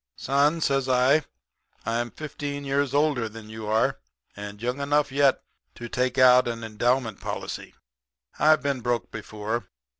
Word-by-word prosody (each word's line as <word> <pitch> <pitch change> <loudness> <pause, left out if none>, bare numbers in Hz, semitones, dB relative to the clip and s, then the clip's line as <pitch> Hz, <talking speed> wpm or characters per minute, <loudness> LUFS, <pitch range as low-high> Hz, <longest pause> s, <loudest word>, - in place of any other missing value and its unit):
"'Son,' 145 +4 +2
says 135 -3 +1
I, 130 +4 +4 0.6
'I'm 120 +1 -1
fifteen 145 0 -6
years 140 0 0
older 140 -5 +1
than 110 0 -11
you 110 -1 -7
are, 110 +1 +1 0.4
and 100 0 -8
young 125 +4 -2
enough 145 0 +1
yet 140 -1 +3 0.3
to 120 - -7
take 125 +2 -1
out 125 -1 +7
an 115 -1 -4
endowment 115 +1 0
policy. - - -5 0.6
I've 155 0 +5
been 140 -3 -1
broke 120 0 -1
before. 110 +1 -4
125 Hz, 145 wpm, -26 LUFS, 115-140 Hz, 0.6 s, out